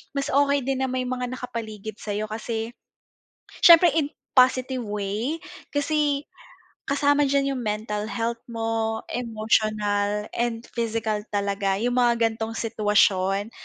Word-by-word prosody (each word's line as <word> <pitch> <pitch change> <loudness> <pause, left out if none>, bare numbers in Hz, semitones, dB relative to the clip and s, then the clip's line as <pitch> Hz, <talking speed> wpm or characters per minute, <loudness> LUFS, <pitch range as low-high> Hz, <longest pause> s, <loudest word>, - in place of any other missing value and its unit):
mas 275 +1 -1
okey 280 +1 +3
din 265 -1 -1
na - - -3
may 255 0 -1
mga 250 0 -2
nakapaligid 220 -4 -6
sa'yo 210 0 -3
kasi 225 +1 -4 0.9
syempre 340 0 +9
in 295 -3 +1 0.3
positive 255 0 +4
way 210 +8 -2 0.4
kasi, 290 -1 +1 0.6
kasama 285 0 +3
diyan 275 0 +1
yung 255 - -3
mental 210 0 -2
health 230 0 -2
mo, 225 -1 -1
emotional 215 -3 0
and 235 -1 -1
physical 225 -2 -1
talaga 200 -1 0
yung 245 +2 0
mga 240 -1 +4 0.2
gan'tong 225 0 -4
sitwasyon 205 -2 +2
230 Hz, 125 wpm, -25 LUFS, 210-260 Hz, 0.9 s, syempre